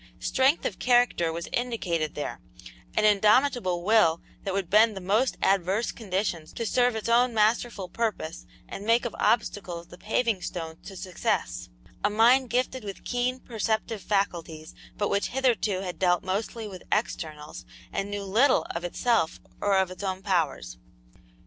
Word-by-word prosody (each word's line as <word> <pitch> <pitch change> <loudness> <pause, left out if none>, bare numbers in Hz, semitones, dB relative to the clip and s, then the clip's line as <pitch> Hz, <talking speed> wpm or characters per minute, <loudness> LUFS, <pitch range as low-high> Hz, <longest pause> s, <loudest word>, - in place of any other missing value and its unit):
Strength 270 +4 +2
of 195 - -3
character 240 -9 +3
was 170 +1 -5
indicated 180 -11 -1
there; 145 - -4 0.6
an 215 - +4
indomitable 210 -3 +3
will 175 -6 +4 0.2
that 195 - -2
would 195 -3 -1
bend 210 +2 +4
the - - -3
most 210 +8 +1
adverse 195 +3 +2
conditions 185 -6 -3
to 230 - -3
serve 245 +1 +2
its 220 - -4
own 240 +1 +3
masterful 215 -2 +1
purpose 185 -5 -3 0.2
and 195 - -7
make 230 +3 +3
of 240 - -4
obstacles 180 -6 0
the 175 - -13
paving 220 -2 0
stones 165 -3 -5
to 195 - -9
success; 185 -1 -2 0.3
a - - +3
mind 240 +4 +4
gifted 255 +1 -1
with 200 -2 -7
keen 250 +1 -1
perceptive 220 -2 -2
faculties, 170 -6 -2 0.2
but 205 - 0
which 200 0 +1
hitherto 235 -7 +1
had 180 -2 -6
dealt 180 -2 +2
mostly 215 +4 -3
with 185 -3 -9
externals 155 -8 -3 0.3
and 195 +1 -2
knew 205 0 -4
little 235 +8 +3
of 170 - -4
itself 180 -1 0 0.2
or 200 -1 +3
of 190 -1 +1
its 185 - -9
own 190 -1 -3
powers. 150 - -1
205 Hz, 155 wpm, -27 LUFS, 180-230 Hz, 0.6 s, an